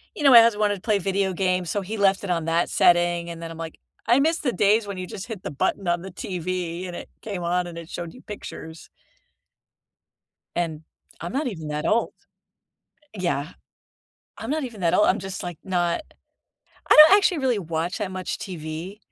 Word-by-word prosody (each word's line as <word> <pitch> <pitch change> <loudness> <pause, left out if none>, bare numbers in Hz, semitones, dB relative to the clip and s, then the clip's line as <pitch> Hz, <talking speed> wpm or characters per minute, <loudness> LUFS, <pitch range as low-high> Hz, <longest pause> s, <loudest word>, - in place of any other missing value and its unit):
you 300 - -5
know, 275 - +7
my 235 -2 +11
husband 220 -2 +3
wanted 205 -1 +2
to 185 - -12
play 210 -3 +1
video 195 0 0
games, 185 -1 0
so 205 - -1
he 215 +4 -5
left 195 0 +3
it 195 - -5
on 165 -2 0
that 165 +1 +1
setting, 175 0 +3
and 170 0 -7
then 165 - -6
I'm, 165 - -9
like, 165 -1 -7 0.3
"I 245 +3 +5
miss 325 +2 +2
the 255 -5 -1
days 205 +3 +3
when 200 -2 -5
you 185 - -4
just 195 - -7
hit 215 -5 -7
the - - -4
button 185 +7 -1
on 175 0 +1
the 190 0 -8
TV 180 -1 -4
and 175 - -7
it - - -8
came 195 -5 -5
on 175 +1 0
and 170 -1 -9
it 165 0 -9
showed 170 -1 -6
you 255 - -14
pictures." 160 -5 -9 1.7
and 160 -3 -2 0.4
I'm 170 +7 -5
not 280 0 0
even 160 -9 -5
that 150 0 -3
old. 230 +2 +1 1.0
Yeah, 175 -5 -2 0.9
I'm 225 +4 -5
not 310 -2 -1
even 225 -6 -8
that 170 -2 +2
old. 210 - +5
I'm 200 - +3
just, 190 0 -6
like, 175 -3 -6
not 175 - 0 0.9
I - - +8
don't 400 - +7
actually 365 -4 +2
really 255 -6 +1
watch 165 +2 -3
that 195 -3 -3
much 185 -1 -4
TV. 170 +2 -6
185 Hz, 205 wpm, -24 LUFS, 170-210 Hz, 1.7 s, my